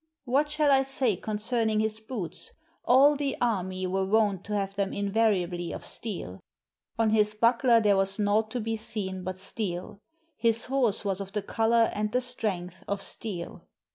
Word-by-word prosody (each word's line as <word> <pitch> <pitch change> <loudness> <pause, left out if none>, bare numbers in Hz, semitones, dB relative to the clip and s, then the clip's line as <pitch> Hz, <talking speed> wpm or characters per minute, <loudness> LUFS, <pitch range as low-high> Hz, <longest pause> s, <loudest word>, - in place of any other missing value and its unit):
What 280 +4 +1
shall 300 -1 +2
I 270 -1 +5
say 265 -5 +1
concerning 220 +2 0
his 220 0 -1
boots? 215 - -6 0.3
All 275 +4 +6
the 280 -1 -2
army 185 -5 -1
were 190 +1 0
wont 200 -1 +1
to 210 - -3
have 195 -1 -2
them 195 -1 -2
invariably 195 -4 0
of - - -6
steel; 175 - -4 0.6
on 225 -1 +2
his 210 -1 +3
buckler 235 +1 +4
there 205 -3 +3
was 195 0 +1
naught 210 +1 +1
to 245 - -3
be 225 0 -2
seen 195 -4 -4
but 185 +1 -4
steel; 190 -1 -5 0.4
his 230 -1 +2
horse 245 -6 +1
was 195 -1 -1
of 195 0 -8
the 210 - -2
color 225 +2 +2
and 210 0 -2
the 250 - +2
strength 190 -8 -3
of 200 0 -2
steel. 180 -6 -6
215 Hz, 170 wpm, -28 LUFS, 195-230 Hz, 0.6 s, All